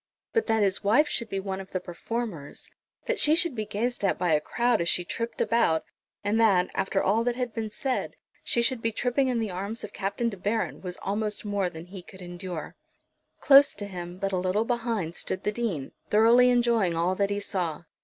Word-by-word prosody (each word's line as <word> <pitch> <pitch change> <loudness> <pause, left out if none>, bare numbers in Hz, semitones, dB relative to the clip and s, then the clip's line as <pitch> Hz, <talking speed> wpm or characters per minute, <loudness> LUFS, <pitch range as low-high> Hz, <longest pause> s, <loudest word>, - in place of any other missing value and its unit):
But 455 - +1
that 220 -2 +3
his 195 -1 0
wife 240 +10 +4
should 235 -6 -1
be 195 - -2
one 190 0 -4
of 190 - -12
the 185 - 0
performers, 180 -3 -5 0.3
that - - -1
she 300 +1 +5
should 340 -3 +1
be 215 -3 -4
gazed 235 +3 -2
at 195 - +2
by 175 -2 +1
a 150 - +3
crowd 240 +1 +1
as 170 - +1
she 175 - +2
tripped 230 +5 -4
about, 230 -9 +2 0.4
and 205 +2 +1
that, 195 -5 +4
after 195 0 0
all 220 +4 +2
that 245 0 0
had 250 -2 -3
been 220 -2 -3
said, 260 +4 -2 0.3
she 235 - +1
should 250 -1 +1
be 230 - 0
tripping 245 +4 +1
in 250 -2 0
the 220 -3 -1
arms 200 +5 -4
of - - -7
Captain 200 +4 -2
De 200 - -8
Baron, 205 +5 -2
was 180 -1 -6
almost 210 +2 -2
more 200 -3 0
than 160 -1 -9
he 185 +1 -9
could 185 +1 -12
endure. 175 -2 -6 0.7
Close 280 0 +7
to 205 - -5
him, 175 -2 -7
but 195 +1 -2
a - - +2
little 185 +4 +1
behind, 230 -8 -2
stood 185 - -3
the 210 - +1
Dean, 205 - -3 0.2
thoroughly 235 +4 +6
enjoying 235 -7 +2
all 170 +3 +1
that 200 +1 0
he 205 0 -1
saw. 180 -6 -3
205 Hz, 215 wpm, -27 LUFS, 185-235 Hz, 0.7 s, Close